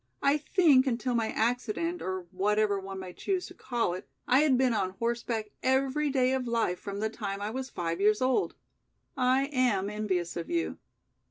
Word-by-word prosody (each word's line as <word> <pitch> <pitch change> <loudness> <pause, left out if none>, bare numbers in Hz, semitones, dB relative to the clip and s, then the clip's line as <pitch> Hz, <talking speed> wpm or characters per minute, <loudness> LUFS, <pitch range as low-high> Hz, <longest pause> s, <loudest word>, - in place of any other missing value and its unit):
I 280 +2 +4
think 295 -4 +4
until 245 0 0
my 230 -2 +1
accident, 245 +10 -1
or 185 0 -3
whatever 205 +1 +1
one 195 0 -7
may 185 -1 -8
choose 375 - -2
to - - -10
call 240 - -1
it, 185 - -8 0.2
I 255 - +5
had 290 -4 +4
been 255 -2 +3
on 190 -3 -1
horseback 230 -2 -2
every 270 +3 +1
day 260 -1 +2
of 260 -2 -1
life 230 -6 0
from 200 0 -5
the 220 - 0
time 200 -3 -4
I 205 +1 -3
was 260 +2 -4
five 170 -2 -3
years 210 +1 +4
old. 260 +9 +1 0.6
I 260 +1 +3
am 210 -7 +2
envious 190 -5 -2
of 170 - -5
you. 340 0 -1
235 Hz, 185 wpm, -29 LUFS, 200-265 Hz, 0.6 s, I